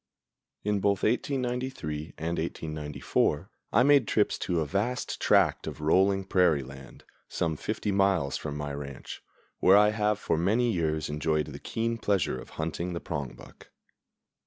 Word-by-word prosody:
In 105 0 +1
both 100 0 +1
1893 125 - -2
and 85 +2 -2
1894 75 -3 -2 0.2
I - - +5
made 140 -4 +5
trips 105 - +1
to 90 -3 0
a 80 - 0
vast 105 - -2
tract - - +3
of - - -6
rolling 95 +5 +3
prairie 90 -7 +3
land, 65 +1 -12 0.3
some 80 -2 -1
fifty 105 +5 -3
miles 95 -7 +2
from 75 0 -4
my 75 -1 -4
ranch, 70 -1 -7 0.4
where 95 +2 +6
I 105 0 +6
have 105 -1 +1
for 80 - -1
many 115 +7 +2
years 80 -4 -1
enjoyed 75 0 0
the - - -9
keen 115 0 -2
pleasure 100 -11 0
of - - -13
hunting 80 +3 -3
the 85 - -3
prongbuck. 70 -7 -7
90 Hz, 150 wpm, -28 LUFS, 75-105 Hz, 0.4 s, where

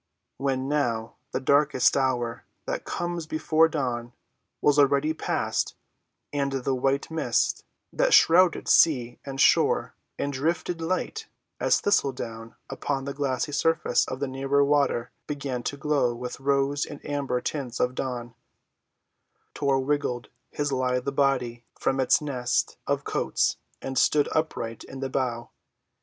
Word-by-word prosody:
When, 135 -1 -1
now, 120 -6 -1 0.2
the - - -1
darkest 140 0 +3
hour, 125 -3 0 0.2
that - - -3
comes 175 -2 -3
before 155 0 +3
dawn, 125 -6 -3 0.5
was 145 0 +3
already 140 +2 +3
past, - - -1 0.6
and 140 -1 0
the 135 0 -1
white 135 +4 0
mist 160 -1 0 0.3
that - - +2
shrouded 175 - +5
sea 125 -7 +4
and 135 -1 -6
shore - - +3 0.2
and 140 - -2
drifted 165 +4 -1
light 185 - -2 0.3
as - - +3
thistle‐ 140 -10 +2
down 115 -1 -7
upon 135 -2 -3
the 140 - -4
glassy 140 0 -1
surface 160 -4 +2
of 130 - -5
the 140 - -1
nearer 135 +2 +1
water 140 -4 +1 0.2
began 140 -4 -3
to 140 - -4
glow 140 -4 +1
with 125 +2 -6
rose 140 +1 +1
and 145 - -8
amber 140 -3 -1
tints 125 -3 -4
of 125 0 +1
dawn, 120 -2 -4 1.2
Tor 135 -2 +1
wriggled 140 -4 -1 0.2
his 145 -1 -2
lithe 130 -1 +1
little 140 - 0
body 130 -4 0 0.2
from 135 - 0
its 130 - +4
nest 125 -4 -1
of - - 0
coats - - 0 0.3
and 135 0 -1
stood 145 -1 +3
upright 115 -8 -2
in 135 - -9
the 135 0 -3
bow. 120 -3 -2
135 Hz, 145 wpm, -26 LUFS, 125-145 Hz, 1.2 s, shrouded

